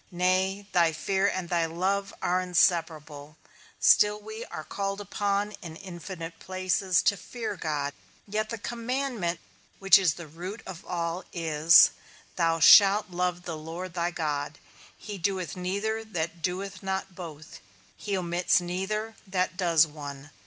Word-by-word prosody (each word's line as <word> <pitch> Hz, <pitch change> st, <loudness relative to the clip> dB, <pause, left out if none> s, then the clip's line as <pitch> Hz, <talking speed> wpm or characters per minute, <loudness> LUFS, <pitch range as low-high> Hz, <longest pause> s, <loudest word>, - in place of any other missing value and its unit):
Nay, 185 Hz, +2 st, 0 dB
thy 170 Hz, -3 st, +3 dB
fear, 190 Hz, +5 st, 0 dB
and 185 Hz, -3 st, -2 dB
thy 170 Hz, -1 st, +1 dB
love 195 Hz, +4 st, -1 dB
are 180 Hz, +1 st, +2 dB
inseparable; 160 Hz, -4 st, 0 dB, 0.4 s
still 210 Hz, 0 st, +5 dB
we 220 Hz, +2 st, -8 dB
are 155 Hz, -, -7 dB
called 195 Hz, +4 st, -3 dB
upon, 205 Hz, 0 st, -1 dB
in 160 Hz, -2 st, -8 dB
infinite 175 Hz, -2 st, -8 dB
places, 185 Hz, 0 st, 0 dB
to 200 Hz, -, +3 dB
fear 225 Hz, +2 st, -5 dB
God, 145 Hz, -4 st, -2 dB, 0.3 s
yet 215 Hz, +1 st, -2 dB
the 230 Hz, -, -4 dB
commandment, 235 Hz, -5 st, -2 dB, 0.4 s
which 195 Hz, 0 st, +7 dB
is 175 Hz, -6 st, +2 dB
the 170 Hz, -, -8 dB
root 180 Hz, +8 st, -8 dB
of 180 Hz, -3 st, -8 dB
all 170 Hz, +1 st, -2 dB
is, 160 Hz, -1 st, +6 dB, 0.4 s
Thou 165 Hz, -2 st, +1 dB
shalt 200 Hz, +3 st, +7 dB
love 180 Hz, 0 st, -1 dB
the 170 Hz, -2 st, -5 dB
Lord 165 Hz, +3 st, -7 dB
thy 170 Hz, 0 st, 0 dB
God; 150 Hz, -3 st, -3 dB, 0.4 s
he 205 Hz, -2 st, -7 dB
doeth 185 Hz, -3 st, -2 dB
neither 200 Hz, +5 st, -2 dB
that 170 Hz, -5 st, -4 dB
doeth 185 Hz, +2 st, -3 dB
not 190 Hz, 0 st, -3 dB
both; 160 Hz, -3 st, -10 dB, 0.4 s
he 200 Hz, -2 st, -3 dB
omits 175 Hz, +2 st, +2 dB
neither, 190 Hz, +5 st, -3 dB
that 185 Hz, -1 st, -1 dB
does 170 Hz, -4 st, +4 dB
one. 145 Hz, -2 st, -9 dB
180 Hz, 145 wpm, -27 LUFS, 165-195 Hz, 0.4 s, which